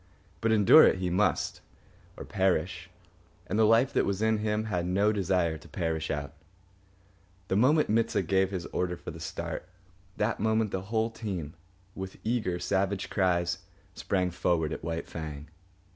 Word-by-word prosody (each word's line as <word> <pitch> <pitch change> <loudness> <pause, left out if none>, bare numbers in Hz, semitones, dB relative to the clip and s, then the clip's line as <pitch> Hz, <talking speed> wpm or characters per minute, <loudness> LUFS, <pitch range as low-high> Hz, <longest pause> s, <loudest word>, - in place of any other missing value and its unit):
But 115 - +2
endure 105 -3 +8
it - - +2
he 90 -1 -2
must, 100 +4 0 0.6
or - - -7
perish, 95 0 0 0.6
and 105 - -1
the 110 - +6
life 115 +5 +4
that - - +3
was 100 -1 -1
in 110 0 +2
him 105 0 0
had 90 -5 -2
no 100 +4 +2
desire 90 -6 0
to - - -15
perish 80 -3 -2
out. 70 0 -3 1.2
The - - +1
moment 145 +9 +4
Mit 115 +1 +2
sah - - +1
gave 95 -1 +1
his 95 -3 -4
order 90 -1 -1
for - - -8
the - - -10
start, 90 - -5 0.5
that 110 +2 0
moment 110 -1 +1
the 95 - -2
whole 115 0 0
team, 95 -10 -5 0.4
with 95 -1 -7
eager, 110 -6 0
savage 95 +1 -1
cries, 90 -2 +1 0.3
sprang 90 -2 -1
forward 80 -3 0
at - - -7
White 80 0 -3
Fang. 75 -2 -7
95 Hz, 165 wpm, -29 LUFS, 85-110 Hz, 1.2 s, endure